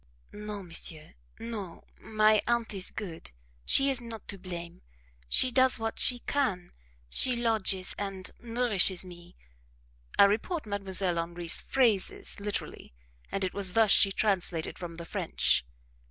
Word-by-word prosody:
"No 210 -1 -7
monsieur, 165 -2 -3 0.2
no 210 -7 -7 0.2
my 215 -1 +3
aunt 235 -2 0
is 190 -2 -3
good 175 -7 -7 0.4
she 275 0 +6
is 255 -2 -1
not 230 -2 -9
to 195 - -7
blame 175 -2 -8 0.5
she 255 - +5
does 260 +1 +3
what 225 -1 -4
she 245 - +3
can; 250 -11 -1 0.4
she 250 - +3
lodges 220 -5 +1
and 195 -2 -5
nourishes 225 -6 +3
me" 175 -1 -13 0.8
(I - - +8
report 225 - +1
Mdlle. 195 -3 -1
Henri's 170 0 0
phrases 230 -9 +1
literally, 200 - -5 0.4
and 195 - -2
it 185 - -2
was 195 -3 -1
thus 220 -1 +4
she 195 - +5
translated 190 -5 -1
from 170 -2 -7
the 170 0 -8
French). 60 - 0
200 Hz, 140 wpm, -29 LUFS, 180-225 Hz, 0.8 s, I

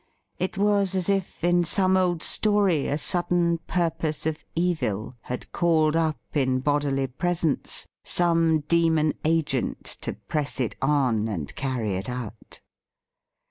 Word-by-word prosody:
It 185 +1 -2
was 200 -1 +2
as 185 0 +1
if 195 -4 -1
in 175 0 +3
some 185 +2 +2
old 180 -3 +1
story 200 -8 +3
a 145 - 0
sudden 175 +1 +1
purpose 165 -3 -1
of 160 -1 -2
evil 155 - -1
had 125 - -6
called 160 -2 +2
up 160 -2 +1 0.2
in 130 -3 +1
bodily 140 -1 0
presence 165 +3 -1 0.2
some 165 -2 +2
demon 160 -1 +2
agent 155 -5 0 0.2
to - - -2
press 145 -3 -3
it 125 -4 -1
on 130 -6 +2
and 85 -10 -5
carry 130 -6 -2
it 95 - -4
out. 120 -3 -7
160 Hz, 135 wpm, -25 LUFS, 135-175 Hz, 0.2 s, in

